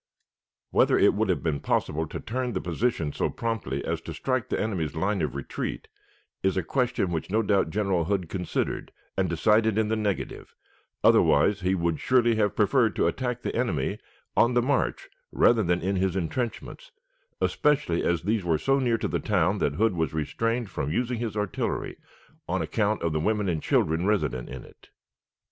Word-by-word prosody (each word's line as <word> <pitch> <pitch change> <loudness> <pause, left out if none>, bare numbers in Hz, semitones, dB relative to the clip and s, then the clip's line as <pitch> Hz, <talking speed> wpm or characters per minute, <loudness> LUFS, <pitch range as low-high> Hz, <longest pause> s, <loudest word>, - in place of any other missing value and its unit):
Whether - - +4
it - - +5
would - - 0
have - - 0
been 75 -4 0
possible 80 +1 -1
to - - -6
turn 125 +1 -3
the 95 - -1
position 85 -3 -1
so - - 0
promptly 110 - -3
as - - -2
to - - -7
strike 130 -3 -1
the - - -1
enemy's 90 -8 -2
line 95 +3 0
of - - -2
retreat 70 - -4 0.5
is 95 -1 +1
a 95 - +1
question 125 -5 0
which 80 +1 -3
no 110 +3 +2
doubt 100 -5 +2
General 95 -3 0
Hood 95 -2 -1
considered 90 0 -3 0.2
and 95 -2 0
decided 105 +5 +3
in 110 -1 +1
the 110 - +1
negative, 105 -3 -3 0.5
otherwise 100 -1 +4
he 95 +1 +1
would 85 -3 -1
surely 120 -2 +3
have 105 -2 +1
preferred 115 +1 +3
to - - +2
attack 125 -2 -2
the - - -3
enemy 95 - -1 0.4
on 120 +1 +4
the 120 - +4
march 145 - 0 0.2
rather 115 -2 +4
than 90 -2 +1
in 95 +3 0
his 95 -1 0
intrenchments, 120 - -4 0.5
especially 145 - +1
as 85 -1 0
these 105 +1 0
were 85 -2 +2
so 135 - +2
near 120 -3 +2
to - - -2
the - - -1
town 95 -1 +1
that 70 - 0
Hood 110 +2 +2
was 80 -2 -1
restrained 115 - -1
from 70 -3 -3
using 120 +5 -1
his 115 -3 -3
artillery 105 -1 -2 0.5
on - - 0
account 105 -2 0
of 85 -2 0
the 80 - 0
women 105 +4 0
and 80 -4 -1
children 80 +4 +1
resident 65 -13 0
in 65 -2 -7
it. - - -19
100 Hz, 185 wpm, -26 LUFS, 85-115 Hz, 0.5 s, it